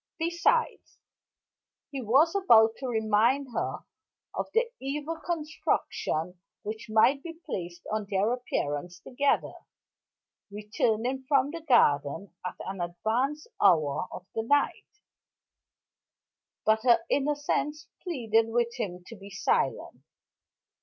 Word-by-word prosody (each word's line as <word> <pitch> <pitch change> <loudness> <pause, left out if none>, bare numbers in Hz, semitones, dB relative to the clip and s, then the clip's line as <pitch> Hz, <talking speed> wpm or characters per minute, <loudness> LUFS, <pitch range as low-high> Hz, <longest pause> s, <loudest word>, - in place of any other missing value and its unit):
Besides 345 +8 0 0.5
" - - -64
He 275 -2 -4
was 270 +9 +4
about 225 - +5
to 265 - -5
remind 230 +4 +2
her - - -2 0.5
of - - -3
the 470 +1 +1
evil 295 +4 -4
construction 245 - -2 0.2
which 215 +1 -6
might 240 +6 +4
be 330 0 -9
placed 175 -1 -6
on 215 -2 -2
their 205 +4 +1
appearance 175 - -3
together, 280 +8 0 1.0
returning 220 +5 -1
from 280 0 +3
the 335 0 -6
garden 170 - +2
at 180 0 -4
an 190 -1 -5
advanced 225 - -1 0.2
hour 155 0 +3
of 180 - -8
the 225 - -1
night; 285 +5 +1 1.8
but 220 0 +3
her 235 -2 +4
innocence 295 +1 0
pleaded 225 - +1
with 235 0 0
him 180 -2 -4
to 230 - -10
be 200 -1 -12
silent. 435 - -1
230 Hz, 115 wpm, -28 LUFS, 200-290 Hz, 1.8 s, about